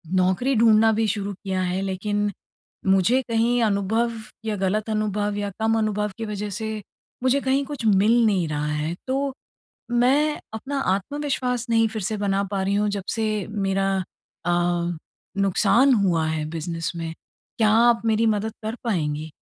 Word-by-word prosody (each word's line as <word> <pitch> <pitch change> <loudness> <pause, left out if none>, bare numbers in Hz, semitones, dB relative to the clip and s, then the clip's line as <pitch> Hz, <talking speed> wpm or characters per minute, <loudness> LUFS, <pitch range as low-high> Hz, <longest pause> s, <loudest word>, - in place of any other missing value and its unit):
नौकरी 190 +9 +2
ढूँढना 225 0 +5
भी 220 0 +1
शुरू 205 0 -2
किया 190 0 -3
है, 185 +1 -1
लेकिन 205 +2 -1 0.6
मुझे 195 +7 +4
कहीं 235 +1 +2
अनुभव 220 +3 +1 0.3
या 215 -1 -1
गलत 205 +3 -1
अनुभव 210 -1 -1
या 205 0 -2
कम 225 0 +2
अनुभव 210 -1 0
की 225 - -4
वजह 210 0 -4
से, 215 +2 -4 0.4
मुझे 260 +2 +3
कहीं 270 +1 +1
कुछ 275 -5 -6
मिल 220 +3 +4
नहीं 190 -6 +2
रहा 150 0 -2
है। 150 +2 -2
तो 270 +1 -1 0.6
मैं 275 +5 +3
अपना 275 +6 -3 0.2
आत्मविश्वास 250 +1 -2
नहीं 225 -1 +4
फिर 220 -1 -4
से 215 +3 -1
बना 200 -1 0
पा 195 -1 -1
रही 195 - 0
हूँ, 210 0 +1
जबसे 210 +1 -2
मेरा 195 -2 0 0.6
अ, 175 0 +1 0.5
नुक़सान 210 +7 +4
हुआ 180 -7 +2
है 155 -1 -1
बिज़नेस 165 +1 -3
में। 165 -1 -4 0.4
क्या 220 -2 +4 0.2
आप 230 -1 +2
मेरी 225 0 +2
मदद 215 +1 -3
कर 220 +2 -3
पाएँगी? 155 -7 -2
210 Hz, 155 wpm, -24 LUFS, 190-230 Hz, 0.6 s, ढूँढना